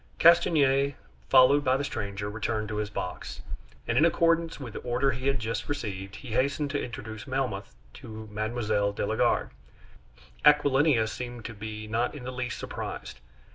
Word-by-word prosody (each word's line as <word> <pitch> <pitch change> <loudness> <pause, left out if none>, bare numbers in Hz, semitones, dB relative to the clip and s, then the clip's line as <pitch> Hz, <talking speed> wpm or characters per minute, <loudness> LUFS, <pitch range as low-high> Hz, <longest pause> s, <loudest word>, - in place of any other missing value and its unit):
Castanier, 140 -5 +5 0.3
followed 135 +2 +6
by 130 0 +3
the 140 - -2
stranger, 100 -7 -4
returned 110 +1 -2
to 105 - -3
his 105 -1 -2
box; 90 -2 -5 0.4
and 115 - +2
in - - +5
accordance 165 -1 +2
with 125 -6 -7
the - - -5
order 125 +3 +1
he 130 +2 -3
had 135 0 +3
just 115 +1 -3
received, 100 -8 -4
he 130 - -9
hastened 140 +5 0
to 145 - -1
introduce 110 -2 -7
Melmoth 125 - -2 0.2
to 110 0 -9
Mme. 110 +2 -2 0.3
de - - -1
la - - -1
Garde. - - +2 0.9
Aquilina 145 -4 +5
seemed 120 +1 -6
to 115 - -5
be 110 +1 -6
not 115 +5 0
in 140 - -8
the 130 - -4
least 125 -1 -3
surprised. - - -6
125 Hz, 170 wpm, -28 LUFS, 110-140 Hz, 0.9 s, followed